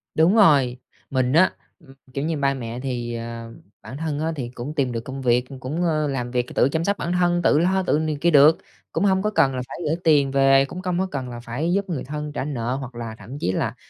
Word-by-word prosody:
Đúng 165 +7 +4
rồi. 140 - +5 0.3
Mình 130 -1 0
á, 175 +4 +5 0.3
ừm, 135 -5 -17 0.2
kiểu 140 +2 -2
như, 160 -1 -1
ba 140 -1 +1
mẹ 120 -2 -6
thì, 120 -3 -3
ờ 115 0 -7 0.3
bản 135 - -9
thân 155 -2 -3
á 160 +1 -1
thì 125 -4 -4
cũng 125 +4 -7
tìm 135 -4 0
được 115 - -2
công 135 +3 -7
việc, 125 -1 +2
cũng, 145 +7 -3
ơ, 155 -3 +1
làm 125 -3 -3
việc 125 -1 0
c - - -12
tự 130 - +4
chăm 160 +3 -1
sóc 200 +3 0
bản 175 - -3
thân, 175 -1 +2
tự 150 - +4
lo, 190 +3 +2
tự 165 - +2
này 155 -2 -1
kia 170 - +4
được, 150 +2 +7 0.3
cũng 205 - 0
hông 190 -1 +3
có 210 - 0
cần 135 -10 +2
là 125 - -2
phải - - -8
gửi 150 - +1
tiền 145 -4 +4
về, 135 0 +5
cũng 180 +6 -8
công 180 -1 -1
có 190 - +1
cần 130 -3 -4
là 120 - -7
phải 135 +9 -2
giúp 200 0 -1
người 160 -7 -3
thân 150 +1 -5
trả 140 - -3
nợ 125 -4 -2
hoặc 130 -2 -7
là 115 -2 -6
thậm 135 +3 -9
chí 90 - 0
là - - -2
140 Hz, 265 wpm, -23 LUFS, 125-165 Hz, 0.3 s, được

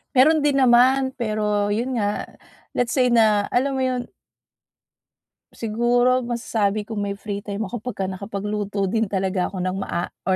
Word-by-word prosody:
Meron 310 +5 +6
din 280 -2 +3
naman 260 +2 +5
pero 210 -3 0
yun 245 +3 -1
nga, 205 0 -1 0.5
let's 245 -1 +1
say 250 -2 +3
na 215 -3 +4
alam 270 +3 +1
mo 265 - 0
yun. 250 -1 -1 1.5
Siguro 240 +3 +2
masasabi 215 -3 -1
ko 215 -1 -5
may 200 0 -2
free 200 0 -5
time 205 +1 -4
ako 220 +3 -5
pagka 225 -4 -4
nakapagluto 200 +1 -3
din 220 +3 0
talaga 190 -1 -1
ako 185 -2 -5
ng 185 +1 -2
maa 175 -2 -3 0.2
or 190 - +3
215 Hz, 155 wpm, -22 LUFS, 200-245 Hz, 1.5 s, Meron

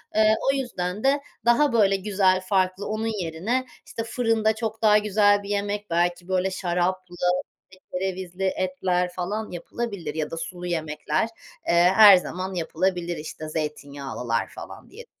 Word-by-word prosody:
Eee, 215 0 +5 0.2
o - - -1
yüzden 210 -7 -3
de 275 +2 +3 0.2
daha 240 +3 +4
böyle 200 -4 +4
güzel, 190 -1 +2
farklı, 185 0 0
onun 215 +1 -2 0.2
yerine, 195 +11 -1 0.2
işte, 225 - -5
fırında 225 -2 +1
çok 220 0 -4
daha 210 -1 +6
güzel 205 -1 +3
bir 200 - -8
yemek, 205 0 -2
belki 175 +1 0
böyle 190 0 0
şaraplı, 180 0 -2 0.6
işte, 185 0 -18
kerevizli 185 0 -3
etler 185 -1 0
falan 205 +4 -3
yapılabilir 180 -2 -5
ya 155 -1 -2
da 165 - -5
sulu 175 +2 -6
yemekler, 155 +3 -1 0.4
eee, - - +2 0.2
her 205 -3 +10
zaman 185 +1 -4
yapılabilir. 175 0 -1
İşte, 155 0 -7
zeytinyağlılar 140 -6 -3
falan - - -11
diye - - -12
185 Hz, 145 wpm, -25 LUFS, 175-210 Hz, 0.6 s, her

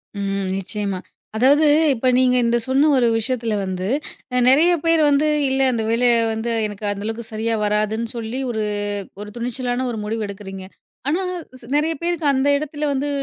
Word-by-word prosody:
ம் 195 -1 -2
நிச்சயமா. 195 -1 -3 0.4
அதாவது 285 +6 +4 0.3
இப்ப 255 +1 -1
நீங்க 255 -1 +4
இந்த 235 0 +2
சொன்ன 275 +4 +3
ஒரு 240 - +3
விஷயத்தில 225 -1 0
வந்து, 185 0 -3 0.5
அ - - +3
நெறைய 310 +7 +5
பேர் 330 -1 +4
வந்து 285 +2 +3 0.2
இல்ல, 265 0 +1
அந்த 225 -2 -1
வேலைய 240 +1 +3 0.2
வந்து 225 +2 -3 0.2
எனக்கு 205 0 -7
அந்த 200 0 -5
அளவுக்கு 225 +1 -4
சரியா 225 +1 -1
வராதுன்னு 215 +2 0
சொல்லி, 230 +3 -4
ஒரு 220 -2 -2 0.6
ஒரு 210 - -7
துணிச்சலான 245 +1 -2
ஒரு 225 - -4
முடிவு 220 +1 -2
எடுக்குறீங்க. 195 -1 -8 0.4
ஆனா 345 +6 +1 0.4
சி - - -13
நெறைய 315 +2 +1
பேருக்கு 340 -2 -1
அந்த 270 +1 +1
இடத்தில 300 +1 -4
வந்து 280 +1 -1
235 Hz, 170 wpm, -21 LUFS, 210-270 Hz, 0.6 s, நெறைய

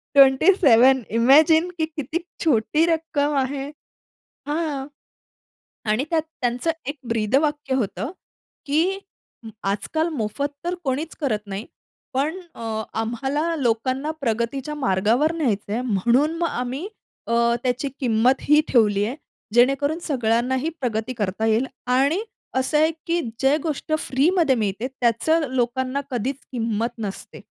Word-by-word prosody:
27 265 - +6 0.2
imagine 315 +7 +6
की 320 - +1
किती 310 +1 -4 0.3
छोटी 295 +4 +3
रक्कम 320 -3 0
आहे. 275 +1 -4 0.8
हां. 295 -3 -2 1.1
आणि 235 +6 +1
त्यात 325 -2 +2 0.2
त्यांचं 245 +7 0 0.2
एक 290 - -2
ब्रीदवाक्य 270 +6 +1
होतं 220 - -2 0.5
की 300 +3 +2 0.8
आजकाल 315 +11 0
मोफत 280 +1 -2 0.2
तर 355 +1 -1
कोणीच 285 +4 -2
करत 215 -7 -1
नाही. 200 +3 -5 0.5
पण 305 +8 -1 0.2
अ, 220 -1 -3 0.2
आम्हाला 270 +9 -1
लोकांना 260 +3 0
प्रगतीच्या 245 +5 -2
मार्गावर 245 - +2
न्यायचंय 225 -6 -1
म्हणून 250 - +2
मग 340 0 +1
आम्ही 255 +9 -3 0.4
अ, 230 - -1 0.3
त्याची 250 +2 0
किंमत 245 +1 +2
ही 300 +1 +5
ठेवली 210 -4 +3
आहे. 250 +5 -3 0.4
जेणेकरून 275 +6 +3
सगळ्यांनाही 255 +2 +1
प्रगती 230 0 -2
करता 205 +1 -1
येईल 225 +4 +2 0.2
आणि 275 +9 +2 0.4
असं 260 +4 +1
आहे 315 +1 +4 0.2
की 340 +1 +1 0.2
जे 270 +2 +4
गोष्ट 310 0 -3
फ्रीमध्ये 300 +1 +2
मिळते, 215 +2 -1
त्याचं 270 +5 +1
लोकांना 260 +2 0
कधीच 250 +3 -1 0.2
किंमत 230 -1 -1
नसते. 200 -2 -6
265 Hz, 120 wpm, -23 LUFS, 230-300 Hz, 1.1 s, 27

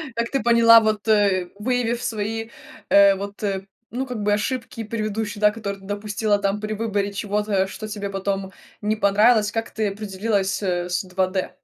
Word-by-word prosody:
как 235 0 -1
ты 275 - 0
поняла, 230 -1 +7
вот, 215 -1 -1
э, 200 -4 +3
выявив 240 0 0
свои, 225 +1 -3 0.4
э, 200 -1 +6
вот, 200 +2 -7 0.5
ну, 260 +3 -2
как 240 -5 -5
бы 205 0 +2
ошибки 230 +1 -3
предыдущие, 215 -1 -3
да, 210 0 +5
которые 200 -3 -5
ты - - -14
допустила 205 +1 -1
там 200 +1 -1
при 215 0 -3
выборе 205 -2 -1
чего-то, 205 -1 0
что 215 +3 -7
тебе 205 -2 -5
потом 195 0 -3 0.3
не 210 +1 0
понравилось, 210 +1 +4
как 225 +1 -3
ты 215 -2 -1
определилась, 200 0 -2
э, 180 -2 -1
с 180 +3 -1
2D? 185 0 -1
210 Hz, 170 wpm, -23 LUFS, 200-225 Hz, 0.5 s, поняла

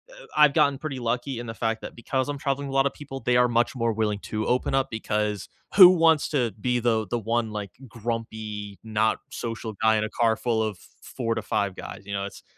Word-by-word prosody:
eh, - - -16 0.2
I've 150 -2 +6
gotten 140 -1 +3
pretty 145 -4 -4
lucky 120 +2 -2
in 120 - -6
the 115 - -5
fact 115 -1 -2
that - - -8
because 130 +2 -2
I'm 145 - -2
traveling 140 0 -2
with 135 - -6
a - - -3
lot 135 0 +4
of - - -4
people, 135 -2 -8
they 125 0 +2
are 125 0 +5
much 120 +1 +1
more 115 -2 0
willing 105 -1 -1
to 110 0 -2
open 125 +2 +1
up 135 0 +2
because 105 -2 -2 0.3
who 190 -3 +12
wants 165 -4 +4
to 125 -6 +1
be 125 +1 +1
the 110 -3 +1
the 120 +6 -1
one, 115 0 -1
like, 105 -3 -5 0.2
grumpy, 110 -3 -5
not 110 0 +1
social 115 -1 -5
guy 110 0 +5
in 105 - 0
a 110 - -3
car 115 0 +2
full 115 -1 0
of 110 -3 -3 0.2
4 115 -2 -3
to - - -2
5 100 -3 -1
guys, 100 +1 -8
you 100 - -6
know, 100 0 -2
it's 100 - -10
115 Hz, 240 wpm, -25 LUFS, 110-130 Hz, 0.3 s, who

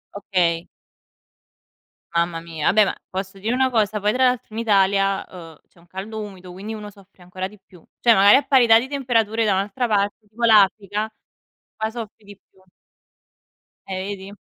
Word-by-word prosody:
Okay. 175 -4 0 1.5
Mamma 170 0 0
mia. 165 -2 -1
Beh 215 - +6
ma, 190 - -2 0.2
posso 190 +1 -6
dire 220 +5 -1
una 260 0 +2
cosa 215 -3 0
poi 210 - +2
tra 255 +3 +2
l'altro 250 -3 -1
in 225 - -4
Italia, 195 -2 +2
uhm, 165 -4 -12
c'è 175 - -25
un 175 - -23
caldo 200 +5 -7
umido, 190 -4 -9
quindi 200 +5 -7
uno 210 -1 -7
soffre 200 -2 -20
ancora 185 +1 -5
di 210 +2 -16
più; 190 -3 -20 0.2
cioè 235 - +6
magari 200 0 +7
a 275 - +3
parità 245 -5 +5
di 260 - -6
temperature 230 -5 0
da 205 - +2
un'altra 205 +6 -1
parte 205 +1 -1
tipo 225 +3 -8
l'Africa, 210 -1 +3 0.7
qua 220 0 -2
soffri 225 -2 -9
di 205 -1 -14
più. 190 -1 -27 1.3
Eh, 185 -1 -4
vedi? 195 +1 -11
205 Hz, 175 wpm, -22 LUFS, 190-220 Hz, 1.5 s, magari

